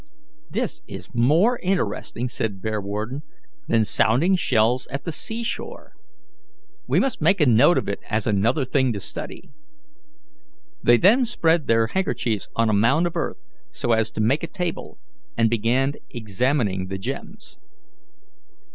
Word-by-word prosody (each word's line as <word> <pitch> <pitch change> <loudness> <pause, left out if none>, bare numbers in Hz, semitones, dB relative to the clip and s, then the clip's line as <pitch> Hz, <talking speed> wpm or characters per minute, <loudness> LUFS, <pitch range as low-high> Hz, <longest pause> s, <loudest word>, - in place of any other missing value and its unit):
"This - - -3
is - - -9
more 160 - +3
interesting," 125 - -2
said 110 -5 -3
Bearwarden, 110 +5 -3 0.5
"than 110 -1 +2
sounding 130 - +3
shells 125 -6 +1
at 140 +1 -5
the 165 - -3
sea 225 +8 -4
shore. 235 - -6 0.9
We - - +3
must 265 -9 -1
make 170 +6 +3
a 150 - +5
note 135 +8 +5
of - - -1
it 100 - -3
as 110 -1 -1
another 115 +7 +1
thing 130 -1 +1
to 100 - -4
study." - - -7 1.3
They 120 0 +5
then 215 - +5
spread 170 - +1
their 115 0 +3
handkerchiefs 120 - -2
on 115 0 +2
a 110 - +2
mound 115 +11 +3
of 175 0 -3
earth, 165 - -3 0.3
so 120 - -2
as 110 -1 +2
to - - -2
make 130 +8 +2
a 165 - -3
table, 180 -2 -5 0.4
and 115 -1 +3
began 120 +5 +1 0.2
examining 110 -3 -1
the 95 +1 -4
gems. 95 - -7
120 Hz, 145 wpm, -23 LUFS, 110-165 Hz, 1.3 s, a